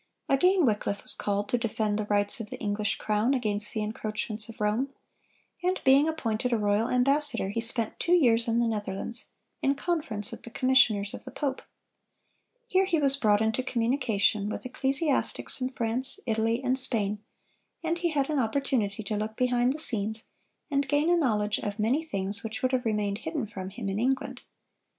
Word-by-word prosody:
Again 360 +5 +3
Wycliffe 205 -3 -1
was - - +1
called 205 0 -2
to 245 - +1
defend 215 -2 -1
the 215 - -2
rights 205 +1 +1
of 220 -2 -6
the - - -6
English 205 0 -1
crown 215 +5 0
against 210 -4 +1
the 215 -2 -2
encroachments 215 +1 -2
of 225 - -11
Rome; 215 +6 0 0.7
and 365 +1 0
being 275 +4 +5
appointed 250 -6 -2
a 235 - +2
royal 210 +2 +1
ambassador, 275 -3 +2
he 230 +3 -2
spent 230 -1 -1
two 345 - +1
years 235 -9 +4
in 230 0 +1
the 235 - +2
Netherlands, 210 +1 -4 0.3
in 275 +1 +2
conference 290 - -2
with - - -9
the - - -10
commissioners 240 -6 +3
of - - -8
the - - -8
pope. 275 -2 -3 1.1
Here 380 -3 +2
he 365 -3 +1
was 275 -2 +3
brought 215 -6 +2
into 220 +3 +1
communication 230 -5 0
with - - -5
ecclesiastics 275 +4 -1
from 255 0 -1
France, 250 +1 +1
Italy, 225 +1 0
and 260 +1 +4
Spain, 210 -5 +5 0.6
and 335 +1 -1
he 345 -1 0
had 280 -4 0
an 295 - +1
opportunity 225 -4 -1
to 210 - -3
look 215 +1 -3
behind 245 0 +2
the 285 - -4
scenes, 220 -6 -1 0.5
and 280 -1 +1
gain 295 +4 +2
a - - +5
knowledge 215 -10 +1
of 205 0 -4
many 240 +9 +1
things 200 -7 -3
which 220 +1 -5
would 255 - +2
have 255 -2 0
remained 210 -2 -1
hidden 315 -5 -3
from 190 -3 -7
him 200 0 -6
in 195 +1 -2
England. 260 +3 -1
230 Hz, 185 wpm, -27 LUFS, 210-270 Hz, 1.1 s, being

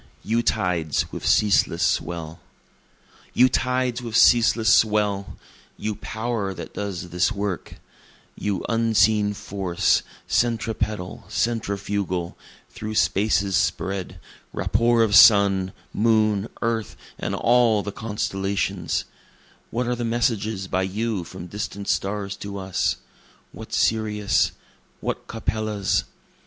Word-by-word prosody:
[III] - - -7
You 115 +1 +3
Tides 90 - 0
with - - -5
Ceaseless 105 -2 +3
Swell 85 -1 -1 1.0
You 125 - +6
tides 125 -1 0
with 115 -2 -1
ceaseless 115 -2 +5
swell! 105 -3 +1 0.4
you 110 - -2
power 110 -2 -3
that - - -8
does 95 -4 -5
this 90 +5 +1
work! 100 -4 -4 0.6
You 100 -2 -2
unseen 110 -2 +2
force, 95 -3 0 0.2
centripetal, 110 -4 -1
centrifugal, 100 -5 -2 0.4
through 110 0 -6
space's 100 -1 +2
spread, 95 0 -1 0.3
Rapport 115 +1 +2
of 105 -2 +2
sun, 100 -4 +6 0.2
moon, 110 -2 +2 0.2
earth, 115 -1 -1 0.2
and - - -2
all 120 -3 +3
the 100 - -4
constellations, 100 -4 -2 0.6
What 125 +2 -2
are 125 +1 0
the 120 - -4
messages 110 -4 -1
by 95 0 0
you 100 +1 -2
from 85 +1 -9
distant 100 +1 -6
stars 100 0 -1
to 100 0 -6
us? 95 -1 -1 0.6
what - - -10
Sirius'? 105 -2 +1 0.5
what - - -4
Capella's? 110 -2 -1
105 Hz, 110 wpm, -23 LUFS, 95-115 Hz, 1.0 s, You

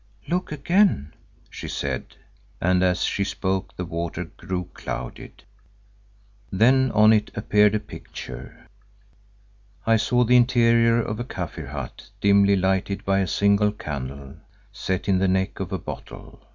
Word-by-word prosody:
"Look 180 0 -1
again," 155 - +2 0.4
she - - -7
said, - - -4 0.4
and 90 +1 +2
as 90 0 +2
she 100 - 0
spoke 95 -1 -2
the 90 - -4
water 85 +1 -4
grew 90 +2 -5
clouded. - - -7 1.1
Then 130 +7 +4
on 110 +1 +6
it 105 -1 +1
appeared 105 0 +3
a - - +1
picture. 65 -9 -10 1.2
I 115 0 +4
saw 120 +3 +2
the 125 +1 +4
interior 115 -1 +4
of 110 -1 -3
a - - -1
Kaffir 90 - -6
hut 70 -3 -7
dimly 100 0 +5
lighted 95 +1 0
by 95 0 +2
a 95 - 0
single 100 +2 +3
candle 70 -5 -7 0.4
set 95 -1 -3
in 95 -2 +3
the 95 - +2
neck 95 +1 0
of 95 -2 -4
a 95 - -1
bottle. - - -9
100 Hz, 140 wpm, -24 LUFS, 90-115 Hz, 1.2 s, on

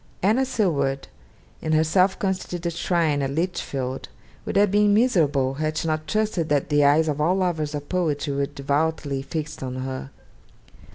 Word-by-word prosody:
Anna 225 +7 +3
Seward, 140 - 0 0.5
in 155 - -1
her 155 0 +4
self 185 +4 +2
constituted 180 -3 -2
shrine 165 -4 +1
at 135 - -1
Lichfield, 140 -5 -3 0.4
would - - -3
have 205 -1 +4
been 205 0 +4
miserable, 150 - +2
had 155 +2 -2
she 165 - -1
not 155 0 -2
trusted 210 -3 0
that 145 -2 +1
the 145 -1 +3
eyes 150 +3 +4
of 150 -1 -1
all 170 +5 +3
lovers 160 -5 -1
of 145 0 -6
poetry 155 -5 -1
were 140 0 0
devoutly 145 0 -1
fixed 150 +2 -5
on 130 -1 -4
her. 130 +1 -5
155 Hz, 165 wpm, -24 LUFS, 140-180 Hz, 0.5 s, her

